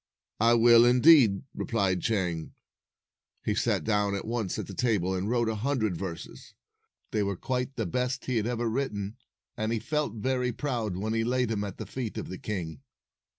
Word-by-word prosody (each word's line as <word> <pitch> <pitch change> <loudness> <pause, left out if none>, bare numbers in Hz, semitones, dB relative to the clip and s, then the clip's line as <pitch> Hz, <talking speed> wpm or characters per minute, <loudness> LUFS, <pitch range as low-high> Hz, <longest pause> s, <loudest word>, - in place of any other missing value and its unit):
"I 115 +2 +5
will, 115 0 +7
indeed," 125 -4 +6
replied 95 -6 0
Chang. 90 -7 -1 0.9
He - - +1
sat - - 0
down 105 -2 +1
at 100 - -4
once 115 -4 -2
at - - -4
a 100 - -8
table, 95 -4 +1
and 95 +3 -2
wrote 120 -1 +1
a 110 - 0
hundred 110 -3 -1
verses. 85 -3 -7 0.6
They 105 - 0
were 100 -1 -1
quite 125 +4 -2
the 115 - -2
best 125 +8 -2
he 125 -2 0
had 110 0 0
ever 120 -1 -1
written, 110 -3 -2 0.4
and 110 +1 -2
he 115 - +1
felt 145 +1 -2
very 125 +2 0
proud 115 -9 -2
when 110 +3 -2
he 115 0 +1
laid 125 0 +1
them 105 -2 -1
at 100 -2 -6
the - - -6
feet 125 -5 -5
of - - -5
the 95 - -6
king. 85 -9 -5
110 Hz, 190 wpm, -28 LUFS, 100-125 Hz, 0.9 s, will